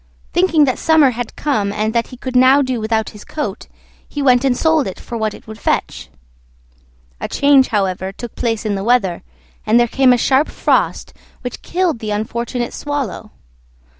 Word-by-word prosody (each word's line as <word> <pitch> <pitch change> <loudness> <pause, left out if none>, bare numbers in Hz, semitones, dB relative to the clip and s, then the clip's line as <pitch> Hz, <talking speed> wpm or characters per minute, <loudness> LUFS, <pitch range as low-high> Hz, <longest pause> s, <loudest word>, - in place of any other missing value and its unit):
Thinking 335 -5 +4
that 260 - -1
summer 315 -5 +4
had 245 0 -6
come, 215 -9 -1
and 215 +1 -1
that 235 -1 0
he 250 - -12
could 255 0 -6
now 260 +3 +6
do 255 -3 -2
without 220 0 -1
his 210 - -12
coat, 220 -10 -5 0.4
he 290 - -6
went 255 -2 +4
and 260 -2 +1
sold 320 -3 +2
it 190 - -7
for 240 - -8
what 220 -2 -2
it - - -15
would 220 0 -10
fetch. - - -2 1.1
A - - -3
change, 280 -2 +4
however, 190 -2 -1
took 235 +3 -9
place 225 -2 -2
in 210 - 0
the 195 -1 -3
weather, 225 -6 +1 0.4
and 225 +3 +3
there 240 - +3
came 260 +2 +3
a 245 - +4
sharp 265 +5 +2
frost - - 0 0.3
which 245 -2 -6
killed 350 -7 -1
the 215 - -5
unfortunate 235 +3 -3
Swallow. 280 -7 -4
240 Hz, 185 wpm, -18 LUFS, 215-275 Hz, 1.1 s, now